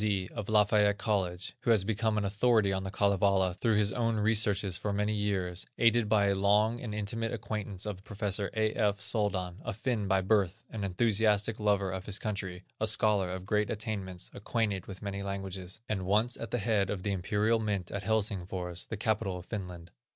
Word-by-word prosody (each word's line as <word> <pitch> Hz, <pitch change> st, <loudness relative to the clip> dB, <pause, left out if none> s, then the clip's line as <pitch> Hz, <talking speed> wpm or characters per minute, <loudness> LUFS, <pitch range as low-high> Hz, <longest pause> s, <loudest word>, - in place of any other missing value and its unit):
D., 100 Hz, -3 st, 0 dB
of 105 Hz, -3 st, -5 dB
Lafayette 105 Hz, -1 st, +4 dB
College, 95 Hz, -5 st, -1 dB
who -, -, -3 dB
has 110 Hz, -4 st, +5 dB
become 110 Hz, +1 st, 0 dB
an 105 Hz, -, 0 dB
authority 105 Hz, 0 st, +3 dB
on 95 Hz, -, -1 dB
the 95 Hz, -, -4 dB
Kalevala 100 Hz, -2 st, +2 dB
through 110 Hz, +3 st, +1 dB
his 105 Hz, -1 st, +3 dB
own 115 Hz, -2 st, +1 dB
researches 105 Hz, -3 st, +2 dB
for 105 Hz, +4 st, -2 dB
many 105 Hz, +1 st, 0 dB
years, 95 Hz, -4 st, -1 dB
aided 115 Hz, -2 st, +3 dB
by 105 Hz, -2 st, +4 dB
a 100 Hz, -, +3 dB
long 105 Hz, +4 st, +2 dB
and 110 Hz, -4 st, -4 dB
intimate 115 Hz, +2 st, -1 dB
acquaintance 105 Hz, -4 st, -3 dB
with 100 Hz, -2 st, -5 dB
Prof. 105 Hz, 0 st, -9 dB, 0.2 s
A. 110 Hz, +2 st, 0 dB
F. 105 Hz, -3 st, +1 dB
Soldan, 95 Hz, -4 st, -1 dB
a 115 Hz, -, -4 dB
Finn 110 Hz, -2 st, -1 dB
by 95 Hz, -1 st, +3 dB
birth, 95 Hz, -2 st, +1 dB
an 110 Hz, -3 st, -4 dB
enthusiastic 105 Hz, +2 st, +2 dB
lover 100 Hz, -2 st, +1 dB
of 95 Hz, 0 st, -5 dB
his 105 Hz, -1 st, -2 dB
country, 95 Hz, -5 st, -4 dB, 0.2 s
a 110 Hz, -, +1 dB
scholar 105 Hz, -3 st, +3 dB
of 95 Hz, 0 st, -5 dB
great 105 Hz, +1 st, +1 dB
attainments, 100 Hz, -5 st, -4 dB
acquainted 105 Hz, -3 st, -2 dB
with 95 Hz, 0 st, -9 dB
many 100 Hz, -1 st, -3 dB
languages, 95 Hz, 0 st, -5 dB
and 95 Hz, -4 st, -2 dB
once 110 Hz, +5 st, +2 dB
at 115 Hz, -, -6 dB
the 120 Hz, -, -1 dB
head 105 Hz, -2 st, +1 dB
of 95 Hz, -3 st, -3 dB
the 100 Hz, -, 0 dB
Imperial 105 Hz, +4 st, +1 dB
Mint 100 Hz, -5 st, -2 dB
at 100 Hz, -, -3 dB
Helsingfors, 95 Hz, -5 st, -2 dB
the 110 Hz, -, -4 dB
capital 100 Hz, -3 st, 0 dB
of 90 Hz, -, -9 dB
Finland. 90 Hz, -5 st, -6 dB
100 Hz, 195 wpm, -30 LUFS, 95-110 Hz, 0.2 s, has